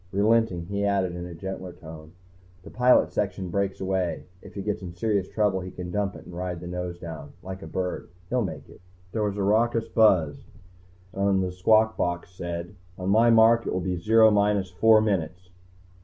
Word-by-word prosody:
Relenting, 105 -3 +2
he 100 +2 -3
added 95 -3 0
in 90 0 -6
a 85 - -9
gentler 95 0 -6
tone, 80 -1 -12 0.5
"The 100 - -12
pilot 125 +2 +4
section 95 -3 -2
breaks 100 0 -1
away. 95 -2 -2 0.2
If - - -14
he 100 - -4
gets 105 +1 -2
in 90 -2 -7
serious 100 0 -1
trouble, 105 -3 +1
he 95 0 -6
can 90 -1 -7
dump 100 0 -1
it - - -12
and 90 - -11
ride 90 -1 -4
the 90 - -9
nose 90 0 -5
down. 80 -4 -9
Like 95 0 -7
a - - -8
bird. 90 -1 -4 0.2
He'll 125 +5 0
make 95 - -6
it." - - -17 0.3
There 110 - -2
was 105 -1 -1
a 100 - -1
raucous 115 +3 +2
buzz, 90 -10 +2 0.7
and 100 -1 +1
a 90 - -2
squawk 110 +4 +3
box 90 0 -2
said: 85 0 -6 0.2
"On 95 +1 -3
my 115 +3 +5
mark 115 0 +5
it - - -1
will 95 - 0
be 90 0 -2
Zero 110 +5 +5
minus 100 -2 +1
four 110 +4 +5
minutes 90 -4 -2
95 Hz, 200 wpm, -26 LUFS, 90-105 Hz, 0.7 s, my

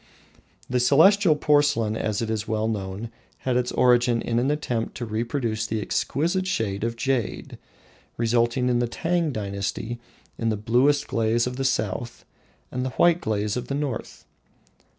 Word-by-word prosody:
The 125 0 0
Celestial 160 - +5
porcelain, 145 -7 +2
as 110 0 -1
is 110 -1 -2
well 110 0 0
known, 105 +1 -4 0.3
had 130 -2 +1
its 125 0 0
origin 120 -1 +4
in 115 0 0
an 130 +3 +1
attempt 125 -6 -2
to 120 - -4
reproduce 115 0 -2
the 110 0 -2
exquisite 170 - -1
shade 105 - -1
of 115 0 -1
jade, 120 0 -2 0.6
resulting, 120 +2 +1
in 120 -1 +2
the 120 - +1
Tang 165 +5 -1
dynasty, 105 +2 -4 0.4
in 115 - 0
the 110 - 0
blue 120 +7 +3
glaze 115 +1 +1
of 125 0 -4
the 135 - -1
south, 120 -2 -2 0.5
and 125 - -2
the 130 - -1
white 175 0 +4
glaze 105 -1 -1
of 125 - -4
the 140 - -2
north. 140 -5 -4
120 Hz, 155 wpm, -24 LUFS, 110-135 Hz, 0.6 s, Celestial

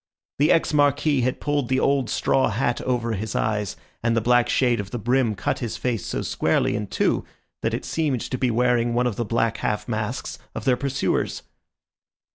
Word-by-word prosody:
The 150 +3 +4
ex 165 - +2
Marquis 145 -1 +3
had 125 +1 0
pulled 145 -4 -1
the 130 0 +2
old 135 -4 +1
straw 135 - +2
hat 120 +3 0
over 120 -2 -1
his 110 +1 -3
eyes, 105 -3 -1 0.3
and 115 0 +1
the - - +5
black 120 +2 +3
shade 120 -4 +2
of 100 -1 -4
the 120 - -4
brim 120 0 +1
cut - - -2
his 120 -3 -4
face 120 -6 -2
so - - -2
squarely - - +1
in 105 -1 -3
two - - +1 0.4
that - - 0
it - - -5
seemed 145 -7 0
to 130 - -3
be 130 - +2
wearing 120 0 +2
one 125 +1 +2
of 120 -4 0
the 120 - -2
black 115 0 0
half 105 0 -2
masks 110 +2 -3 0.2
of - - -5
their 130 -2 +4
pursuers. 140 +2 -1
120 Hz, 200 wpm, -24 LUFS, 110-130 Hz, 0.4 s, the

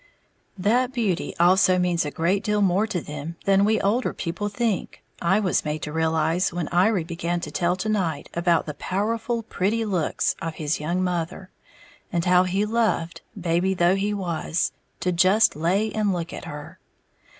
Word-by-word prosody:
That 240 +7 +2
beauty 215 -9 -1
also 185 +1 +5
means 175 -2 +1
a - - -2
great 175 +6 0
deal 210 -1 +1
more 195 +3 +2
to 180 -6 -2
them 150 +3 -7
than 195 0 +4
we 220 +2 +3
older 220 +6 +1
people 190 +4 -3
think, 215 -2 -2 0.2
I 190 +4 +3
was 195 -4 +1
made 150 0 -3
to 150 - -4
realize 160 +2 +1
when 175 -3 -3
Iry 185 +1 +2
began 170 +1 -3
to 150 - -6
tell 170 +5 +1
to 185 +4 -4
night 185 -8 -1
about 170 -1 +2
the 150 - -5
"powerful 225 - -2
pretty 220 +2 -1
looks" 180 -7 0
of 165 -1 -4
his 155 0 -2
young 170 +5 -1
mother, 180 +1 -3 0.6
and 170 -1 0
how 180 0 +5
he 195 +3 0
loved, 215 -7 0 0.2
baby 175 +2 +1
though 175 +1 +3
he 200 +2 0
was, 175 -4 -1 0.3
to 180 - +1
"just 185 +5 +4
lay 190 +8 +1
and 210 -2 0
look 170 -2 -3
at - - -7
her." 150 0 -9
180 Hz, 175 wpm, -24 LUFS, 170-205 Hz, 0.6 s, also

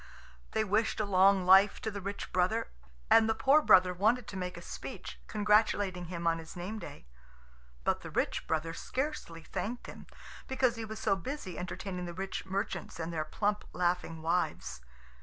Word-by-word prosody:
They 220 - +2
wished 215 +2 +1
a 215 - +1
long 190 -1 +4
life 195 +2 +6
to 220 - -2
the 200 -1 -6
rich 200 +2 -5
brother, 185 +6 +1 0.4
and 225 0 +7
the 225 - +2
poor 275 +6 +5
brother 180 -8 +6
wanted 220 +6 +2
to - - -7
make 180 -1 -4
a - - -8
speech, - - -8
congratulating 205 -3 +2
him 170 0 -5
on 165 0 +2
his 160 0 -10
name 190 +5 -5
day. - - -10 0.8
But - - +1
the - - -7
rich - - -1
brother 160 +1 -1
scarcely 255 - -4
thanked 235 +8 -4
him, - - -10 0.4
because 260 -2 +2
he 225 -1 -5
was 220 0 -7
so 215 -2 +2
busy 250 - -5
entertaining 180 0 -5
the 175 -1 -7
rich 190 +1 -4
merchants 190 -3 -3
and 165 +1 -3
their 155 -1 -1
plump, 205 +5 -1
laughing 175 -2 -1
wives. 170 - -1
190 Hz, 175 wpm, -31 LUFS, 180-220 Hz, 0.8 s, and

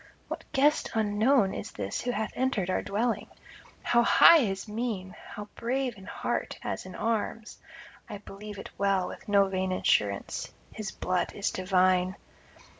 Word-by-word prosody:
What - - -7
guest 295 +3 +3
unknown 215 +1 +3
is - - -6
this - - -3
who 250 - -3
hath 220 -3 -1
entered 240 -8 0
our - - +1
dwelling? 225 +3 -1 0.6
How 235 - +4
high 335 +7 +8
his 195 -5 -1
mien! 210 -4 -3
how 210 0 -8
brave 250 0 -2
in 195 -2 -13
heart - - -3
as - - -4
in 185 - -9
arms! 225 0 -2 0.5
I 210 - -5
believe 205 +1 -10
it 195 - -8
well, 195 -2 +2
with - - -10
no 200 -1 +5
vain 190 -1 -1
assurance, 100 - 0 0.2
his 215 -3 -5
blood 185 -1 -1
is 200 - -1
divine. 185 0 +2
205 Hz, 155 wpm, -28 LUFS, 190-230 Hz, 0.6 s, high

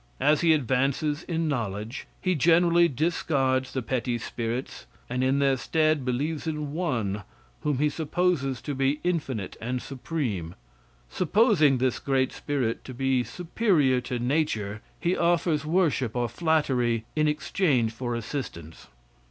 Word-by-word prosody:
As 150 0 +3
he 170 -2 +4
advances 140 +2 0
in 165 -2 -2
knowledge, 110 -3 -3
he 185 -1 +1
generally 170 +2 +4
discards 135 -3 0
the 130 - -3
petty 120 +1 -1
spirits, 115 +2 -4 0.2
and 125 +1 -1
in 130 +1 +2
their 140 -1 +3
stead 155 +3 +1
believes 145 +6 -2
in 150 -2 -3
one, 115 - -1 0.4
whom 150 -3 -1
he 150 +3 +2
supposes 150 -4 0
to 145 - -3
be 135 +2 +1
infinite 140 - -2
and 125 +3 -2
supreme. 125 - -4 0.5
Supposing 180 - +3
this 130 0 0
great 130 -1 +1
spirit 130 -6 -2
to 130 - -8
be 135 -1 +1
superior 165 - +1
to 125 0 -3
nature, 120 -6 -1 0.2
he 175 +2 +1
offers 170 -3 +1
worship 155 - +1
or 120 -1 +1
flattery 125 -5 +1
in 155 0 +2
exchange 150 - +1
for 120 +1 -3
assistance. 110 - -6
135 Hz, 135 wpm, -26 LUFS, 125-160 Hz, 0.5 s, he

